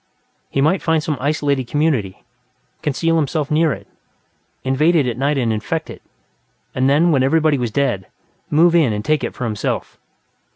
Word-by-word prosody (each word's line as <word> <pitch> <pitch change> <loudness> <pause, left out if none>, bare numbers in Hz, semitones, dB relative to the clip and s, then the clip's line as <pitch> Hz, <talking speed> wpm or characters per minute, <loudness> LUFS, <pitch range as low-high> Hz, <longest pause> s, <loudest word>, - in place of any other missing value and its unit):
He 135 - 0
might 160 +6 +2
find 160 -2 +1
some 155 - -1
isolated 140 -2 0
community, 125 -9 -1 0.6
conceal 165 +3 0
himself 150 -1 -1
near 155 0 +3
it, - - -6 0.8
invade 150 +6 +2
it 150 -5 +3
at 120 -2 -2
night 140 +3 0
and 120 -4 +1
infect 105 -1 -3
it, - - -11 0.7
and 130 +1 +1
then, 160 +5 +4
when 140 -4 +3
everybody 155 +1 +2
was 120 -2 -1
dead, 105 -6 -1 0.4
move 165 +3 +4
in 155 -10 +3
and 105 0 -4
take 155 -1 +1
it - - -4
for - - -5
himself. 110 -3 -3
145 Hz, 170 wpm, -19 LUFS, 125-155 Hz, 0.8 s, then